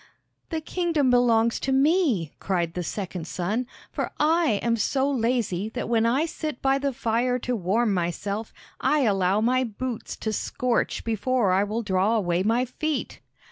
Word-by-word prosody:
"The 320 Hz, -2 st, -2 dB
kingdom 320 Hz, -5 st, +1 dB
belongs 235 Hz, -2 st, +3 dB
to 270 Hz, -, -2 dB
me," 270 Hz, -, +2 dB
cried 175 Hz, -4 st, -1 dB
the 180 Hz, -, -3 dB
second 180 Hz, -2 st, -5 dB
son; 210 Hz, +9 st, -2 dB, 0.2 s
"for -, -, -2 dB
I 320 Hz, -2 st, +3 dB
am 235 Hz, -1 st, +2 dB
so 265 Hz, +5 st, +1 dB
lazy 230 Hz, -7 st, 0 dB
that -, -, -4 dB
when 230 Hz, -1 st, +2 dB
I 265 Hz, +7 st, +2 dB
sit 310 Hz, -4 st, -5 dB
by 270 Hz, 0 st, +2 dB
the 280 Hz, 0 st, 0 dB
fire 245 Hz, 0 st, 0 dB
to 250 Hz, 0 st, -2 dB
warm 210 Hz, +3 st, +1 dB
myself, 195 Hz, +5 st, -2 dB, 0.3 s
I 300 Hz, 0 st, +2 dB
allow 195 Hz, -3 st, +2 dB
my 255 Hz, +3 st, +2 dB
boots 240 Hz, +1 st, -5 dB
to 220 Hz, -, -3 dB
scorch 245 Hz, +3 st, -1 dB
before 225 Hz, -1 st, +1 dB
I 190 Hz, +2 st, +3 dB
will 215 Hz, +3 st, -2 dB
draw 195 Hz, +2 st, +2 dB
away 175 Hz, -5 st, +1 dB
my 230 Hz, +5 st, +2 dB
feet!" 305 Hz, +4 st, -3 dB
230 Hz, 165 wpm, -25 LUFS, 200-265 Hz, 0.3 s, belongs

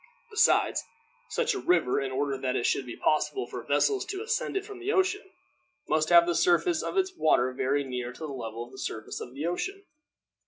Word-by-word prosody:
Besides, 430 Hz, +2 st, +3 dB, 0.5 s
such -, -, 0 dB
a 400 Hz, -, -3 dB
river, 170 Hz, -, +2 dB
in 135 Hz, -1 st, -3 dB
order 140 Hz, +1 st, -1 dB
that 130 Hz, -1 st, -2 dB
it 120 Hz, -, 0 dB
should 130 Hz, -, +1 dB
be 120 Hz, -, -7 dB
possible 275 Hz, -, +1 dB
for -, -, -7 dB
vessels 410 Hz, -2 st, +1 dB
to 395 Hz, +1 st, -4 dB
ascend 460 Hz, -3 st, -1 dB
it 390 Hz, -, -3 dB
from 410 Hz, -3 st, -9 dB
the 380 Hz, +3 st, -1 dB
ocean, 385 Hz, 0 st, +1 dB, 0.6 s
must 155 Hz, 0 st, +1 dB
have 170 Hz, -1 st, +8 dB
the 175 Hz, -, +1 dB
surface 350 Hz, -, +3 dB
of -, -, -4 dB
its 380 Hz, 0 st, +1 dB
water 130 Hz, -, +3 dB
very 135 Hz, +3 st, 0 dB
near 125 Hz, -2 st, -4 dB
the 140 Hz, +6 st, -8 dB
level 120 Hz, -5 st, -5 dB
of 120 Hz, -, -17 dB
the 130 Hz, -, -11 dB
surface 110 Hz, 0 st, -5 dB
of 125 Hz, -, -8 dB
the 145 Hz, +3 st, -3 dB
ocean. 380 Hz, -, -3 dB
160 Hz, 205 wpm, -28 LUFS, -, 0.6 s, have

